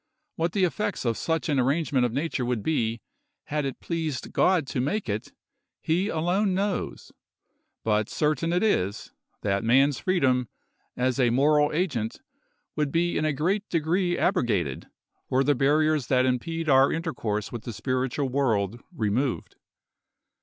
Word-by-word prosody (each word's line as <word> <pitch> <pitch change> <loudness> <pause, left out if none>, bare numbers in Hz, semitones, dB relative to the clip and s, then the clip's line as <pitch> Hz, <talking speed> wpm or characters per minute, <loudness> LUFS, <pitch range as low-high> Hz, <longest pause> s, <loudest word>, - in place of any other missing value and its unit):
What 165 +1 -1
the 195 - +1
effects 205 -1 -1
of 115 -1 +1
such 160 +5 -1
an 145 -4 +1
arrangement 135 -1 +1
of - - -7
nature 140 +1 -2
would 120 -3 -1
be, 115 -7 0 0.4
had 150 -1 -2
it 135 - -4
pleased 160 -5 -3
God 180 -5 +3
to 130 -1 -2
make 200 +11 -1
it, 105 0 -3 0.5
he 175 +5 0
alone 185 +3 +1
knows; 200 0 -2 0.7
but 105 -1 +1
certain 155 +2 0
it 180 +3 +1
is, 100 - 0 0.3
that 100 +1 0
man's 135 +4 +4
freedom, 130 - +1 0.5
as 125 +1 0
a 125 -2 +4
moral 150 +4 +3
agent, 145 - -1 0.6
would 150 -2 0
be 175 +2 +1
in 155 - 0
a 155 - +2
great 185 +9 -1
degree 175 +2 +1
abrogated, 105 - 0 0.4
were 130 +1 +3
the 145 - +3
barriers 150 0 +2
that 130 -1 +3
impede 160 +6 -1
our 135 -1 +5
intercourse 115 - -2
with 120 - -5
the 120 - -4
spiritual 130 +4 -1
world 120 -5 0
removed. 125 - -1
140 Hz, 150 wpm, -26 LUFS, 125-165 Hz, 0.7 s, our